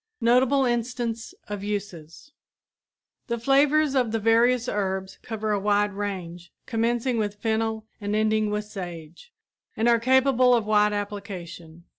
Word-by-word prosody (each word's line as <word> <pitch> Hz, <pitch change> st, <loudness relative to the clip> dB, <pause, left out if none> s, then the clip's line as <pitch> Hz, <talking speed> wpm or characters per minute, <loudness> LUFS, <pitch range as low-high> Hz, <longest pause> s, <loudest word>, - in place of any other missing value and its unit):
NOTABLE 255 Hz, +3 st, +3 dB
INSTANCE 240 Hz, -1 st, -2 dB
OF 205 Hz, -1 st, -5 dB
USES 200 Hz, -, -6 dB, 1.0 s
The 235 Hz, -, -1 dB
flavors 280 Hz, +4 st, +3 dB
of 250 Hz, -5 st, +1 dB
the 225 Hz, -, 0 dB
various 230 Hz, +3 st, +3 dB
herbs 190 Hz, -3 st, -3 dB
cover 220 Hz, -1 st, -3 dB
a 205 Hz, -, +1 dB
wide 205 Hz, 0 st, +1 dB
range, 180 Hz, -4 st, -6 dB
commencing 235 Hz, +1 st, 0 dB
with 205 Hz, -1 st, -2 dB
fennel 220 Hz, 0 st, -2 dB, 0.2 s
and 205 Hz, +1 st, -2 dB
ending 215 Hz, 0 st, +1 dB
with 210 Hz, 0 st, -2 dB
sage, 175 Hz, -, -9 dB, 0.5 s
and 225 Hz, -, +1 dB
are 235 Hz, -1 st, +4 dB
capable 255 Hz, 0 st, +4 dB
of 230 Hz, -3 st, 0 dB
wide 210 Hz, 0 st, +3 dB
application. 190 Hz, -5 st, -7 dB
215 Hz, 135 wpm, -25 LUFS, 205-240 Hz, 1.0 s, are